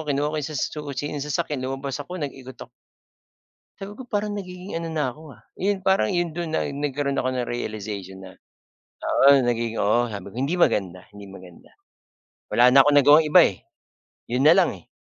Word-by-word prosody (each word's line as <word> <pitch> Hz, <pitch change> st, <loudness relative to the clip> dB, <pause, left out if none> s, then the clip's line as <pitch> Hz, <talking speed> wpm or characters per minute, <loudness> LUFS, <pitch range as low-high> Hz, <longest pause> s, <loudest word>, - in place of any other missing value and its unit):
kinuha 145 Hz, +2 st, 0 dB
ko -, -, -3 dB
sa 150 Hz, +1 st, -5 dB
susi 145 Hz, 0 st, -4 dB
ng 145 Hz, -, -4 dB
sasakyan 150 Hz, -1 st, -3 dB
lumabas 135 Hz, +1 st, -4 dB
ako 175 Hz, +6 st, -7 dB
nag-ikot 135 Hz, -5 st, -7 dB
ako. -, -, -12 dB, 1.1 s
Sabi 200 Hz, +3 st, -9 dB
ko, 260 Hz, -, -9 dB
parang 210 Hz, -2 st, -2 dB
nagiging 180 Hz, -1 st, -7 dB
ano 165 Hz, 0 st, -5 dB
na 145 Hz, -5 st, 0 dB
ko, 150 Hz, 0 st, -13 dB
ah. -, -, -22 dB, 0.2 s
Yun 195 Hz, 0 st, -1 dB
parang 190 Hz, -, +2 dB
yun 175 Hz, +5 st, -1 dB
dun 165 Hz, 0 st, -5 dB
na -, -, +1 dB
nagkaroon 140 Hz, 0 st, -2 dB
ako 130 Hz, -, 0 dB
ng 125 Hz, -1 st, -3 dB
realization 100 Hz, -5 st, -6 dB
na 95 Hz, -, -10 dB, 0.7 s
oo, 140 Hz, 0 st, +5 dB
nagiging 115 Hz, -2 st, -1 dB
oo, 115 Hz, +3 st, +1 dB
sabi 100 Hz, -, -7 dB
ko, -, -, -17 dB
hindi 140 Hz, +7 st, -1 dB
maganda 90 Hz, -, 0 dB
hindi 100 Hz, -, -10 dB
maganda. 90 Hz, -2 st, -14 dB, 0.8 s
Wala 120 Hz, +1 st, +6 dB
na 130 Hz, -, +5 dB
akong 145 Hz, 0 st, +3 dB
nagawang 145 Hz, +3 st, +6 dB
iba, 155 Hz, +4 st, +6 dB
eh, 95 Hz, -, +1 dB, 0.7 s
'yun 130 Hz, +4 st, +1 dB
nalang, 175 Hz, +3 st, +5 dB
eh. 85 Hz, -, -23 dB
140 Hz, 185 wpm, -23 LUFS, 120-160 Hz, 1.1 s, Wala